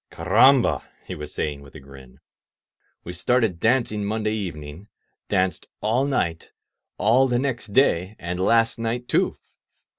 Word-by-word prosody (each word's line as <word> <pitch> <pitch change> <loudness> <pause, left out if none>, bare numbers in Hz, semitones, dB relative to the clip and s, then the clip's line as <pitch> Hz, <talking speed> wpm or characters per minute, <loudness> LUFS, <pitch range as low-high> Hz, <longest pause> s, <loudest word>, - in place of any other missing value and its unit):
Carramhar* 115 +10 +4 0.2
he - - -6
was 75 0 -8
saying 75 -2 -3
with 70 +1 -16
a - - -8
grin; 65 -2 -15 0.8
we 90 - -7
started 105 0 0
dancing 115 -1 +1
Monday 110 +1 -1
evening, 85 -3 -6 0.4
danced 95 -3 -1
all 115 +6 +1
night, 85 -12 -2 0.5
all 120 +7 +3
the 120 -1 0
next 130 -2 -2
day, 100 -4 +2
and 90 +1 -5
last 115 +4 +2
night, 120 +2 -3
too! - - +1
105 Hz, 140 wpm, -23 LUFS, 85-120 Hz, 0.8 s, Carramhar